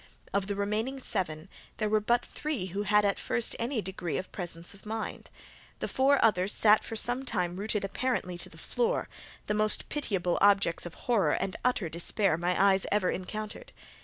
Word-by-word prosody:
Of 200 -1 +1
the 200 - -1
remaining 215 +7 -1
seven, 175 -9 -2 0.3
there 215 - 0
were 215 +1 +3
but 235 +3 +2
three 300 -11 -3
who 200 - -1
had 210 0 +3
at 200 - +1
first 235 - -1
any 235 -2 -1
degree 180 -3 -3
of 185 - -5
presence 175 -1 -6
of 200 - -16
mind. 220 +1 -5 0.5
The - - -3
four 275 +2 +4
others 190 -3 +3
sat 215 0 +5
for 225 - -6
some 245 +4 -1
time 180 -8 -1
rooted 210 +1 -1
apparently 200 -3 -1
to - - -3
the - - -15
floor, 485 +1 -1 0.4
the - - 0
most 215 0 +1
pitiable 195 -12 0
objects 200 -4 +4
of 170 - -10
horror 205 -11 +3
and 190 - -1
utter 250 -8 +1
despair 170 +3 0
my 175 +2 0
eyes 195 -1 +4
ever 200 -3 +2
encountered. 215 - -6
205 Hz, 185 wpm, -30 LUFS, 185-225 Hz, 0.5 s, sat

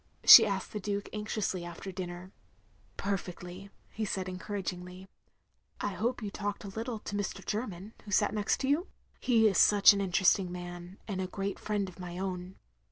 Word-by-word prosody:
she 225 -2 +11
asked 195 -2 -3
the 210 - -3
Duke, 205 0 -3
anxiously, 210 -4 -2
after 175 +3 -7
dinner. 180 0 -7 0.7
"Perfectly," 185 -1 -5 0.2
he 220 - -4
said, 190 -2 -2
encotiragingly. 185 -1 -6 0.7
"I - - -1
hope 230 +5 -2
you 205 - -4
talked 205 +1 -4
a 200 - -6
little 225 +4 -4
to 205 - -6
Mr. 200 -1 -4
Jerm3m, 210 -3 -4
who - - -10
sat 205 0 +2
next 210 +3 0
you? 290 +7 +1 0.3
He 225 -3 +4
is 195 -4 +2
such 205 0 +7
an 200 - -1
interesting 185 -1 +2
man, 175 +1 -8
and 195 -3 -3
a 185 - -2
great 195 +1 -4
friend 205 -2 -2
of 185 0 -12
my 175 -1 -7
own. 185 0 -4
195 Hz, 170 wpm, -30 LUFS, 180-210 Hz, 0.7 s, she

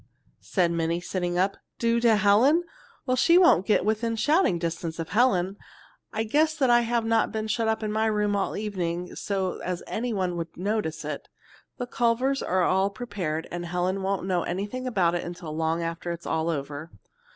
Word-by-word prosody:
said 175 -4 0
Minnie, 170 0 0
sitting 175 -1 -2
up. 190 +2 +1 0.2
"Do 235 0 +2
to 235 -2 +4
Helen? 220 +11 +4 0.4
Well, 255 - +1
she 335 +7 +5
won't 345 - +5
get 210 - +3
within 225 +2 0
shouting 295 - +3
distance 165 -1 -3
of 165 -1 -5
Helen. 195 -3 +2 0.5
I 220 - -1
guess 310 +7 +1
I 245 -3 +5
have 235 -1 0
not 225 -1 +2
been 220 0 -3
shut 225 +1 0
up 220 0 0
in 215 - -1
my 220 +1 +1
room 210 -1 +1
all 200 - -1
evening 180 -4 -3
so 190 -2 -2
as 180 -1 -4
anyone 200 -7 -2
would 165 -1 -6
notice 180 -5 -2
it. 150 - -5 0.5
The 245 - -3
Culvers 245 +3 +1
are 185 0 +1
all 190 +2 +2
prepared, 200 -8 -4
and 175 0 -4
Helen 180 +3 -1
won't 190 -1 -1
know 185 -2 +1
anything 205 +10 -3
about 185 -8 +2
it 175 - -1
until 170 -3 -7
long 165 +1 0
after 165 +1 -4
it 170 0 -5
is - - -16
all 160 +1 0
over." 145 0 -4
195 Hz, 185 wpm, -26 LUFS, 175-230 Hz, 0.5 s, she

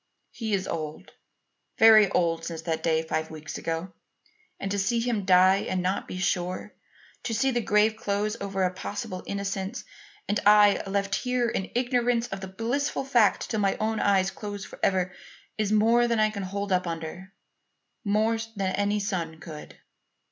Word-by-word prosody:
He 220 -3 -2
is 190 -1 -3
old 155 -2 -5 0.7
very 215 -3 +7
old 165 -2 +1
since 165 -1 -5
that 160 -1 -2
day 160 -1 +1
five 160 0 -2
weeks 155 0 -7
ago; 165 +3 -4 0.7
and 195 - -3
to 200 - 0
see 230 +4 +1
him 230 -4 -1
die 185 +1 +6
and 185 -1 -2
not 185 +2 -1
be - - -6
sure 185 +2 -2 0.5
to 225 - -3
see 265 +5 +2
the 240 -1 0
grave 215 +1 +2
close 210 +1 -1
over 195 -1 -1
a 180 0 +1
possible 200 0 -5
innocence, 200 -1 -3 0.4
and 205 - +1
I 205 -1 +6
left 200 0 -1
here 250 +1 0
in 190 -4 -3
ignorance 245 -1 +1
of 195 0 -5
the 190 - -5
blissful 240 +9 -2
fact 240 -6 +2
till 220 - 0
my 195 -1 +2
own 220 0 -1
eyes 195 -1 +2
close 205 -1 -6
forever, 185 -1 -1 0.5
is 215 -1 0
more 230 +3 +4
than 230 -2 +1
I 215 0 +3
can 200 -2 -5
hold 200 +1 -4
up 180 -1 +1
under; 165 +3 -6 0.7
more 220 +2 +1 0.2
than 190 -2 -1
any 205 +1 0
son 170 -5 -3
could. 155 -2 -10
200 Hz, 170 wpm, -27 LUFS, 185-220 Hz, 0.7 s, very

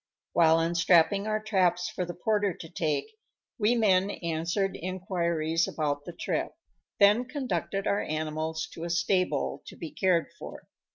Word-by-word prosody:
While 165 -1 +5
unstrapping 170 +4 +3
our 215 0 0
traps 180 -5 +1
for 180 - -3
the 175 - -7
porter 205 -1 0
to 165 - -9
take, 155 -3 -1 0.5
we 220 +3 +3
men 195 -4 +3
answered 170 +3 -2
inquiries 170 -3 -1
about 145 -2 -2
the 175 - -7
trip, - - -2 0.5
then 210 +4 +5
conducted 255 -7 -3
our 200 - +1
animals 155 +1 -3
to 165 - -7
a 170 - -3
stable, 170 -3 0
to - - -9
be 165 - -7
cared 180 -4 +1
for. - - -9
175 Hz, 150 wpm, -28 LUFS, 165-200 Hz, 0.5 s, While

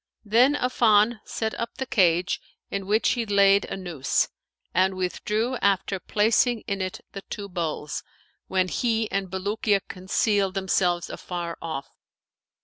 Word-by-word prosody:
Then 245 +7 +4
Affan 230 -3 +3
set 220 -1 -3
up 235 - -4
the 265 - -2
cage, 180 -6 +2 0.3
in 195 -1 -3
which 215 +2 +3
he 240 - +1
laid 200 -2 +4
a - - -5
noose 170 -8 0 0.4
and 190 +1 +3
withdrew 210 +7 -1
after 195 -1 +1
placing 225 +4 +2
in 200 -1 -3
it 185 0 -4
the 195 - -7
two 200 -1 -5
bowls; 165 -5 -3 0.5
when 185 -1 +1
he 225 +2 0
and 195 -1 -1
Bulukiya 200 +2 0
concealed 195 +1 0
themselves 180 -2 +1
afar 170 -2 -5
off. 160 -5 -4
195 Hz, 140 wpm, -25 LUFS, 185-220 Hz, 0.5 s, Then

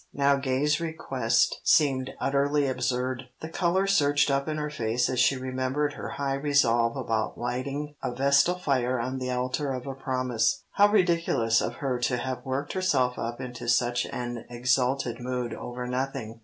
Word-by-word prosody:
Now 140 0 +4
Gay's 140 +3 +1
request 130 -8 0
seemed 135 -4 +3
utterly 140 +1 +1
absurd. 130 0 -1 0.2
The 160 - -5
colour 180 +3 +1
surged 145 -7 +3
up 140 +1 0
in 155 0 -2
her 150 0 -3
face 120 -3 0
as 125 - -1
she 135 - +4
remembered 130 +3 -1
her - - -6
high 140 -1 -2
resolve 125 -4 +2
about 115 -4 -2
lighting 135 +5 -3
a - - -2
vestal 140 +7 +3
fire 130 -7 0
on 130 +3 -3
the 130 0 -3
altar 130 +3 -1
of 130 -1 -4
a 135 - -4
promise. 130 +2 0
How 205 - +5
ridiculous 170 - +2
of - - -3
her 135 -5 -2
to 125 0 0
have 130 +1 -4
worked 135 +2 -3
herself 140 -10 +1
up 115 +1 -4
into 125 -1 -7
such 120 0 +2
an 120 -2 -5
exalted 125 +1 0
mood 125 -1 -3
over 125 0 -6
nothing. 125 -3 -3
130 Hz, 170 wpm, -27 LUFS, 125-145 Hz, 0.2 s, How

